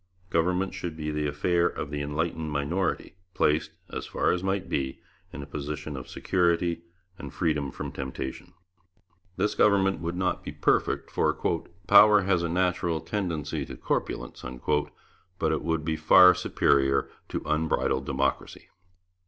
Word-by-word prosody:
Government 90 +3 +1
should 90 -4 -5
be 75 -1 -3
the 75 0 -1
affair 85 +4 +1
of 70 - -5
the 75 0 -3
enlightened 80 +2 -2
minority, 85 +5 -2 0.2
placed, 75 +1 +2 0.2
as - - -5
far - - +1
as 90 - -1
might 95 0 -1
be, 65 -2 -2 0.3
in 70 - -7
a - - -7
position 75 +1 -5
of 65 -2 -8
security 85 -2 +1 0.4
and - - -7
freedom 75 -5 -1
from - - -6
temptation. 65 0 -6 0.8
This 105 +3 +1
government 95 -3 +3
would 85 +2 -3
not 90 -1 -1
be - - -6
perfect, - - 0
for - - +2 0.5
'power 105 +1 +7
has 95 -2 +1
a 85 - -1
natural 90 -1 0
tendency 85 -9 -3
to - - -9
corpulency,' 60 0 -4 0.8
but 80 -2 +1
it 80 - 0
would 80 -2 -1
be 80 -1 -1
far 90 +1 +7
superior 70 0 +2 0.2
to - - -3
an - - -15
unbridled 75 -3 0
democracy. 70 0 -2
80 Hz, 150 wpm, -27 LUFS, 75-90 Hz, 0.8 s, power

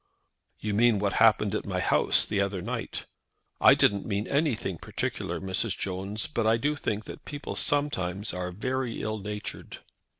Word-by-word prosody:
"You 105 -1 -3
mean 115 +1 +4
what 100 -1 0
happened - - +5
at - - -1
my - - -1
house - - +3
the 100 -2 0
other 100 -1 -1
night?" 115 +5 -4 0.5
"I - - +8
didn't 100 -1 +3
mean 105 0 -2
anything 135 - 0
particular, - - -3
Mrs. 95 +2 -1
Jones. 95 +3 -2
But 115 -2 -1
I 115 +1 +4
do 145 +5 0
think 110 -7 -2
that - - -9
people 145 -1 -6
sometimes 105 -9 0
are 90 0 -3
very 130 +5 -2
ill 110 0 -2
natured." 105 +1 -6
105 Hz, 165 wpm, -28 LUFS, 100-120 Hz, 0.5 s, I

